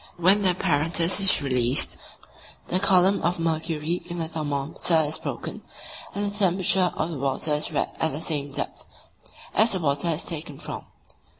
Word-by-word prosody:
When 185 +4 +4
the 190 - +3
apparatus 170 0 +1
is 195 -6 +4
released, 125 -1 +1 0.7
the 185 - +2
column 190 0 +4
of 175 +2 0
mercury 165 0 -1
in 175 - -5
the 165 -1 -2
thermometer 155 +1 0
is 155 +1 -1
broken, - - -5 0.5
and 205 +1 -1
the - - -8
temperature 185 -2 +3
of 160 +2 -2
the 150 - -5
water 140 +3 0
is 150 - +2
read - - -2
at 160 - +2
the 145 - -3
same 145 -3 -1
depth 140 - -4 0.7
as 220 +1 +4
the 190 - 0
water 145 +1 0
is 160 0 -1
taken 150 -3 -3
from. - - -7
165 Hz, 170 wpm, -25 LUFS, 150-180 Hz, 0.7 s, When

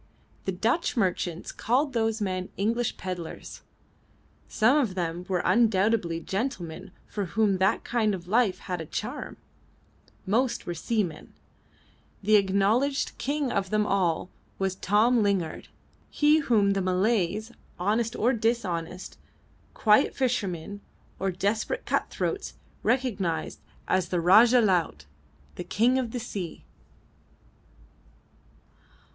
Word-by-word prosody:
The 190 - 0
Dutch 230 - 0
merchants 180 -4 -1
called 265 +5 0
those 225 -1 0
men 185 -2 -2
English 230 +4 0
pedlars; 180 -3 -7 0.9
some 235 +5 +3
of 245 -11 +1
them 175 0 -3
were 180 -2 0
undoubtedly 210 -6 +2
gentlemen 185 -3 -4 0.2
for 205 -2 -4
whom 200 +1 +1
that 190 +1 +2
kind 220 -4 +1
of 175 -1 -10
life 210 -2 +2
had 180 -3 -4
a 160 - -7
charm; 245 - -5 0.9
most 235 +6 0
were 175 - -3
seamen; 180 -2 -3 0.9
the 215 +2 +4
acknowledged 210 +8 +2
king 285 0 -1
of 195 -2 -1
them 215 +1 +1
all 185 -3 0 0.3
was 190 -1 -1
Tom 215 +6 +3
Lingard, 195 -6 -1 0.4
he 300 +1 +4
whom 220 -8 +3
the 195 0 0
Malays, 200 +3 0 0.3
honest 220 +5 0
or 245 +4 +2
dishonest, 190 -7 -2 0.6
quiet 215 +5 +4
fishermen 205 -7 -2 0.4
or 195 - 0
desperate 205 - -1
cut - - 0
throats, 410 - -3 0.3
recognised 205 -10 -1 0.3
as 185 -2 +1
"the 180 - 0
Rajah 225 +8 +6
Laut" 175 - +1 0.5
the - - -4
King 245 +5 +2
of 250 -3 -2
the 245 - -4
Sea. 195 -7 -6
205 Hz, 120 wpm, -27 LUFS, 185-235 Hz, 0.9 s, Rajah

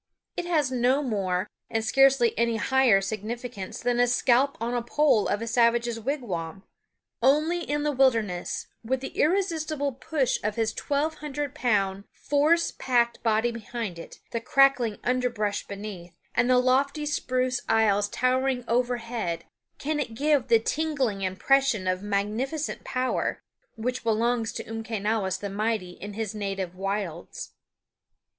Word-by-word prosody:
It 355 - -3
has 305 -6 +1
no 255 +3 +2
more, 195 -6 -1 0.2
and 225 -1 -1
scarcely 270 -1 +4
any 235 0 +1
higher, 245 -3 +4
significance 220 0 -5
than 245 0 0
a 245 - +5
scalp 250 +3 +3
on 230 +2 -2
the 240 - 0
pole 240 -2 +2
of 205 +2 -1
a - - -3
savage's 235 0 +2
wigwam. 200 - -4 0.6
Only 305 +7 +3
in 295 -3 -2
the 300 - +1
wilderness, 230 -10 +1 0.2
with 255 +3 -1
the 270 - -4
irresistible 315 -5 0
push 270 0 -1
of 210 0 -1
his 225 -1 0
twelve 300 +2 -1
hundred 290 -2 -4
pound, 200 -4 0
force 310 +4 +2
packed 240 -2 +1
body 225 +1 +2
behind 230 -5 -5
it, - - -10
the 230 - -2
crackling 255 -4 +3
underbrush 240 -5 -1
beneath, 195 -4 -8 0.2
and 245 - +2
the 255 - +5
lofty 275 +4 +2
spruce 255 -3 0
aisles 205 -2 +3
towering 255 +1 +1
overhead, 235 -6 -1 0.3
can 300 +1 -2
it 235 -6 -3
give 285 -1 +2
the 235 -1 +6
tingling 265 -4 -1
impression 210 +3 +2
of 185 0 0
magnificent 215 +9 -2
power 255 0 -1 0.3
which 250 +3 -3
belongs 230 0 +1
to - - -5
Umquenawis 220 -3 -2
the 200 0 -5
Mighty 210 -3 -1
in 205 +3 -8
his 220 -1 -3
native 195 -4 -3
wilds. 195 -3 -4
235 Hz, 140 wpm, -26 LUFS, 210-270 Hz, 0.6 s, the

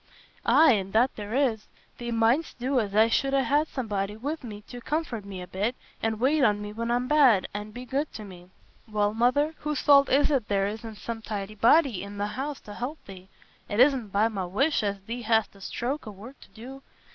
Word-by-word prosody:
"Aye, 320 - +6
an' 195 -2 -2
that 245 +4 +3
there 210 +2 -5
is. 245 -6 0 0.3
Thee 240 0 -5
might'st 235 +7 +1
do 255 +2 0
as 205 -3 -3
I 220 +1 +6
should 270 +4 +1
ha' 275 +3 +2
somebody 210 -6 -3
wi' 285 +7 -3
me 210 -4 -8
to 245 +3 -10
comfort 285 -8 -3
me 190 -2 -7
a - - -10
bit, 205 +7 -2 0.3
an' 220 -1 -1
wait 275 +5 +2
on 210 -4 +3
me 210 0 -6
when 230 +2 -3
I'm 245 +1 0
bad, 260 -9 +4
an' 210 +1 -5
be 245 +4 -9
good 280 +4 -2
to 215 - -7
me." 180 -3 -12 0.4
"Well, 210 -1 0
Mother, 255 +7 +2
whose 300 -2 -2
fault 280 -1 +6
is 285 +3 +3
it 260 -7 0
there 195 -1 +1
isna 220 +2 -5
some 225 +1 -6
tidy 210 -1 -5
body 235 - +3
i' 200 - -8
th' 205 0 -4
house 275 +4 -4
t' 210 - -12
help 250 +9 -5
thee? 190 -1 -12 0.4
It 205 - -2
isna 260 -2 +4
by 205 +2 +2
my 200 -5 -3
wish 275 - +1
as 200 -2 -2
thee 230 +5 -6
hast 220 -2 +1
a 195 - -16
stroke 250 +7 -4
o' - - -5
work 220 +8 -12
to - - -16
do. 260 +5 -11
225 Hz, 220 wpm, -27 LUFS, 205-270 Hz, 0.4 s, Aye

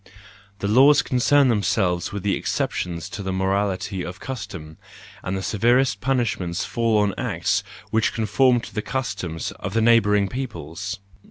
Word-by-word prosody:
The 100 - -3
laws 135 +7 +6
concern 135 +2 +3
themselves 90 -5 +1
with 100 -2 -5
the 100 - +1
exceptions 85 -3 -2
to - - -6
the 95 -1 -3
morality 95 0 -1
of 90 +1 -7
custom; 100 -11 -7 0.4
and 95 +1 -3
the 95 - -4
severest 120 +1 +2
punishments 115 -10 -1
fall 115 -2 +1
on 100 -2 0
acts - - 0 0.3
which 110 -1 +2
conform 120 +3 +2
to - - -10
the 105 - -2
customs 105 -11 -4
of 95 +3 -5
the 115 - +3
neighbouring 105 -3 +4
peoples. 100 - -5
105 Hz, 150 wpm, -23 LUFS, 95-120 Hz, 0.4 s, laws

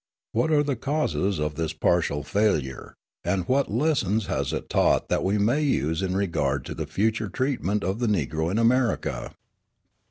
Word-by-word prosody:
What 120 +8 +1
are 150 -1 +4
the 140 -2 -1
causes 130 - -1
of 75 0 -1
this 80 +1 -2
partial 80 -2 +1
failure, 80 -9 -1 0.3
and 95 -2 -1
what 135 +2 +2
lessons 110 - +1
has - - -1
it - - -4
taught - - +2
that - - +1
we 100 +2 +1
may 115 +9 +2
use 80 - 0
in 95 0 -1
regard 70 -9 0
to - - -5
the 80 - -5
future 110 +5 0
treatment 105 -4 -1
of 95 +5 -1
the 120 - 0
Negro 80 -5 0
in 100 - -1
America? 115 - +1
100 Hz, 170 wpm, -25 LUFS, 80-120 Hz, 0.3 s, are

